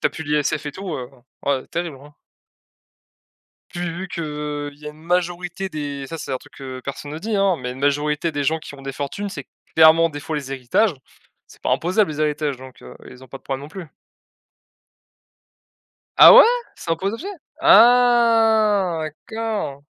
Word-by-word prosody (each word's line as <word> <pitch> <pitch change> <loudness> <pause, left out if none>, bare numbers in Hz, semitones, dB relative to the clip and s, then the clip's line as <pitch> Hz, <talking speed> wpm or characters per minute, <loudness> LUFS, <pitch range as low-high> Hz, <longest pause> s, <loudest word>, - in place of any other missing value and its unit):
n'as - - -2
plus 160 - -8
l'ISF 150 0 -1
et 145 - -4
tout, 190 0 -6
heu, 125 -1 -7 0.4
ouais 135 -2 0
terrible, 170 -4 -4
hein. 145 +1 -15 1.6
Pu 175 - -7
vu 175 +3 -6
qu'il 170 -1 -4 0.5
y 150 - -12
a - - -4
une 150 +1 -18
majorité 175 +2 -2
des 145 -4 -5
ça 165 - -6
c'est 135 - -6
un 130 - -1
truc - - -19
que 130 -2 -8
personne 140 +2 -7
ne 155 - -5
dit, 220 +1 -3 0.3
mais 125 0 -4
une 130 - -8
majorité 150 +3 0
des 145 -1 -2
gens 160 +4 +1
qui 155 - -11
ont 135 - -13
des 135 - -5
fortunes, 145 +10 -5
c'est 145 -8 -8 0.3
clairement 160 +1 +7
des 145 - -7
fois 155 +2 -5
les 140 -3 -4
héritages, 135 - +1 0.5
c'est - - -19
pas - - -1
imposable 185 +2 +1
les 150 0 -5
héritages, 150 -2 -1
donc 130 0 -14
heu, - - -12
ils 125 - -14
ont 130 - -14
pas 135 - -9
de - - -38
problème 135 0 -4
non 145 - -9
plus. 170 0 -9 2.3
Ah, - - +10
ouais? - - +10 0.3
C'est - - -8
un 165 - +2
potager? 205 - -4 0.3
Ah, 230 - +5 0.3
d'accord! 220 -11 -4
160 Hz, 185 wpm, -21 LUFS, 140-190 Hz, 2.3 s, Ah